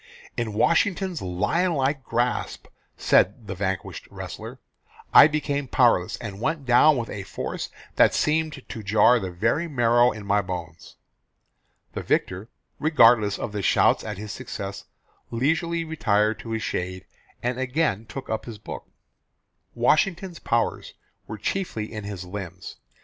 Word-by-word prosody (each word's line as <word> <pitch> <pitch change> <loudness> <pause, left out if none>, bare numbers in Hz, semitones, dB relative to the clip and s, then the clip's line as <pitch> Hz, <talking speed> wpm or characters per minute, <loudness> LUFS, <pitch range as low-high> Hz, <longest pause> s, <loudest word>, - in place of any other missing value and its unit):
"In 115 -3 -2
Washington's 175 - +1
lion 105 - 0
like 135 0 0
grasp," 120 +1 -1 0.3
said 105 +5 +2
the 100 - -5
vanquished 95 -1 -4
wrestler, - - -8 0.6
"I - - +10
became 145 -2 -2
powerless, 115 -8 +3
and 105 -3 -7
went 155 0 -1
down 130 +4 +5
with 115 -2 -4
a 100 - -5
force 95 0 -5 0.3
that - - +5
seemed 155 -2 0
to 110 - -7
jar 110 +4 +4
the 95 -3 -4
very 115 - 0
marrow 120 -3 +3
in 105 -1 -8
my 100 +1 +2
bones." 85 -4 -7 1.0
The - - -4
victor, 95 +5 -1 0.3
regardless 115 -9 +5
of 105 - -5
shouts - - +3
at - - -5
his 105 +1 -6
success, 100 -5 -6 0.4
leisurely 165 +7 0
retired 110 -9 +1
to 115 - -9
his 110 0 -2
shade, 90 0 -3 0.4
and 125 +1 -1
again 130 -5 0
took 135 - -7
up 110 0 -3
his 115 -3 -8
book. 105 - -9 0.9
Washington's 175 +2 +1
powers 115 0 -1 0.3
were 110 - -6
chiefly 110 - -3
in 105 -2 -6
his 100 -3 -6
limbs. 90 -1 -8
115 Hz, 140 wpm, -25 LUFS, 100-145 Hz, 1.0 s, I